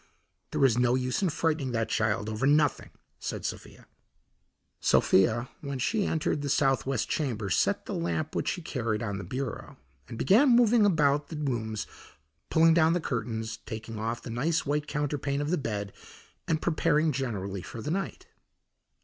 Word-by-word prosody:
"There 135 - +2
is 125 -2 +3
no 125 0 +3
use 130 +4 -1
in 190 - +2
frightening 155 -4 -1
that 115 -1 0
child 110 -1 0
over 110 +4 -1
nothing," 150 0 +2 0.3
said - - -5
Sophia. - - -6 0.9
Sophia, 110 +6 +3
when 140 -2 -5
she 205 - 0
entered 155 -2 0
the 145 - -3
southwest 135 -3 +1
chamber, 115 -9 -2
set 200 - +1
the - - -5
lamp 165 -3 -2
which - - -1
she 180 - -3
carried 115 -7 -2
on 100 -3 -3
the - - -5
bureau, 125 +5 -5 0.3
and 115 -1 -8
began 240 - +5
moving 235 -2 +5
about 145 -5 +2
the 165 - -7
rooms 115 -7 -2 0.6
pulling 165 0 +5
down 165 0 +4
the 175 - +1
curtains, 115 -5 -3
taking 110 0 -7
off 115 +2 -3
the 120 - -6
nice 155 +8 0
white 150 +1 -1
counterpane 145 -1 -2
of 145 +2 -2
the - - +3
bed, 105 -6 -4 0.5
and 160 -1 0
preparing 155 -2 +2
generally 100 -8 -3
for 115 - -8
the 150 - -2
night. 195 +3 -3
135 Hz, 165 wpm, -28 LUFS, 115-155 Hz, 0.9 s, began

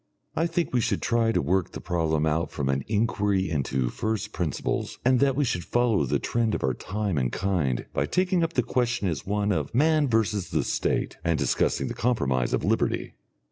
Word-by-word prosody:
I 165 - +1
think 170 -3 -1
we 125 - +3
should 110 -3 -1
try 115 -1 +2
to - - +1
work 90 +4 0
the - - -5
problem 80 -3 0
out 80 +2 0
from 70 -3 -3
an 70 0 0
inquiry 105 -4 +1
into 65 -4 0
first 110 -1 -3
principles, 85 -6 -2
and 130 -1 +4
that 135 -1 +3
we 145 +1 +2
should 90 -8 -1
follow 120 - +2
the - - +1
trend 115 -2 0
of - - -4
our 65 - +2
time 100 - -2
and 60 -2 0
kind 85 -11 -1
by 70 +2 0
taking 185 -1 +1
up 165 0 -1
the 125 - +2
question 120 -3 0
as 80 -4 -3
one 105 0 0
of 80 0 -2
"Man 155 +2 +4
versus 110 -5 0
the - - 0
State," - - -1
and 85 -2 +1
discussing - - +1
the - - -3
compromise 65 - 0
of - - 0
Liberty. - - 0
100 Hz, 205 wpm, -26 LUFS, 80-120 Hz, -, and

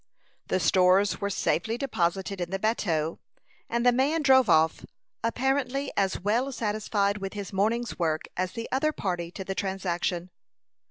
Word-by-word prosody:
The - - +1
stores 185 +2 +3
were 200 - 0
safely 225 +3 0
deposited 195 -6 -1
in 175 - -2
the 195 - -1
bateau, 170 -7 0 0.5
and 235 +1 0
the 245 - +7
man 285 +6 +1
drove 260 -5 +5
off, 160 -1 +3 0.4
apparently 265 +3 0
as 195 -1 +1
well 235 +8 0
satisfied 210 -3 -1
with 195 -1 -5
his 205 -2 -6
morning's 225 +4 0
work 160 -2 0
as 185 0 -2
the 230 -1 -5
other 305 +4 +1
party 175 - -3
to 190 +2 -7
the 195 - -3
transaction. 180 -2 -2
200 Hz, 155 wpm, -27 LUFS, 185-240 Hz, 0.5 s, the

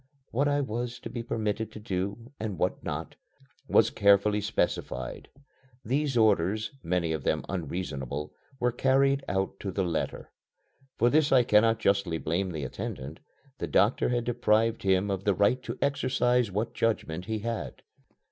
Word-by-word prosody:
What 140 +5 +1
I 145 0 +2
was 120 -1 -3
to - - -7
be 120 - -4
permitted 110 -1 -2
to - - -8
do, 105 +3 -4
and 110 -4 -3
what - - -1
not, - - -4 0.5
was 110 - +4
carefully 100 +1 +4
specified. 65 -10 -2 0.6
These 135 +2 0
orders, 105 - +2
many 85 -1 0
of 80 - -3
them - - 0
unreasonable, 75 -6 -4 0.3
were 125 0 +2
carried 135 +2 +2
out 95 0 -1
to 100 - -4
the 95 +1 -1
letter. 85 -3 -3 0.7
For 120 +1 +3
this 150 -1 +3
I 130 -2 +6
cannot 115 0 +4
justly 100 -6 +1
blame 85 +5 -1
the 80 -4 -4
attendant. 65 +2 -6 0.4
The - - -2
doctor 100 +6 +3
had 120 -1 0
deprived 115 -1 +2
him 95 +1 +2
of 95 -1 -2
the 100 -2 +2
right 105 +7 +3
to - - -6
exercise 125 -4 +2
what 105 +4 -2
judgment 90 -7 -1
he 110 +2 -2
had. 115 +1 -4
105 Hz, 155 wpm, -28 LUFS, 95-120 Hz, 0.7 s, I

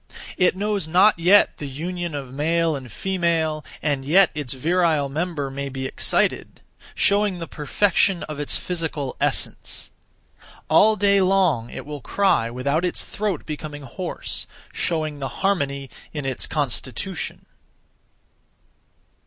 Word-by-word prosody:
It 180 0 +3
knows 200 -3 -1
not 180 +3 +5
yet 190 +5 +5
the 145 - -4
union 170 +4 -4
of 135 -3 -6
male 165 +2 +1
and 130 -4 -8
female, 165 - 0 0.2
and 145 -3 0
yet 175 +6 +5
its 145 -5 -5
virile 160 0 +1
member 150 -2 -2
may 140 +1 -4
be 130 0 -5
excited; - - 0 0.4
showing 200 -2 +3
the 170 - -5
perfection 175 +4 +1
of 150 -1 -6
its 145 - 0
physical 160 -6 -3
essence. - - 0 0.8
All 220 +1 +6
day 200 -1 +4
long 180 -11 +2
it - - -7
will 145 -1 -6
cry 190 - +2
without 140 +7 -1
its 180 - -1
throat 205 -6 -3
becoming 150 -1 -6
hoarse; 125 - -4 0.3
showing 155 -3 -1
the 135 - -3
harmony 140 -8 0 0.3
(in 150 -3 -4
its 130 -2 -2
constitution). 145 - -3
155 Hz, 130 wpm, -23 LUFS, 140-180 Hz, 0.8 s, All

